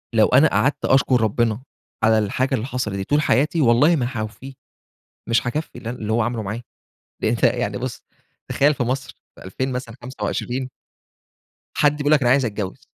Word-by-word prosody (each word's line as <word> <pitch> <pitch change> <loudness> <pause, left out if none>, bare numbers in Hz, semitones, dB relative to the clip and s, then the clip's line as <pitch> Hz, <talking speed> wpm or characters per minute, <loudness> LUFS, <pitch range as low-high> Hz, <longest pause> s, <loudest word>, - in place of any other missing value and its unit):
لو - - +5
أنا - - +5
قعدت - - 0
أشكر 130 -2 +3
ربنا 110 +1 0 0.4
على 110 0 +4
الحاجة 130 +6 0
اللي 115 -2 -3
حصلت 125 -6 -3
دي 95 - -3
طول 145 +7 +1
حياتي، 150 +5 +2
والله 140 +7 +4
ما 125 -5 0
هاوفيه. 115 +3 -6 0.8
مش 115 +1 +1
هاكفي 150 +6 -4
اللي 115 - -6
أنا 125 - -7
اللي 110 0 -3
هو 120 +2 +2
عمله 115 0 -2
معايا. 105 +4 -5 0.6
ده - - +1
أنتَ - - -2
يعني - - +1
بُص - - -5 0.5
تخيَّل 145 +2 +3
في 130 - -2
مصر، 130 +2 -3 0.2
في - - -14
2000 130 +8 -3
مثلًا 125 -2 -5
25 125 +2 -3 1.1
حد 145 0 +2
بيقول 145 0 0
لك 150 -2 +5
أنا 120 - +2
عايز 130 0 +4
أتجوز. 100 -3 -5
125 Hz, 185 wpm, -21 LUFS, 110-135 Hz, 1.1 s, لو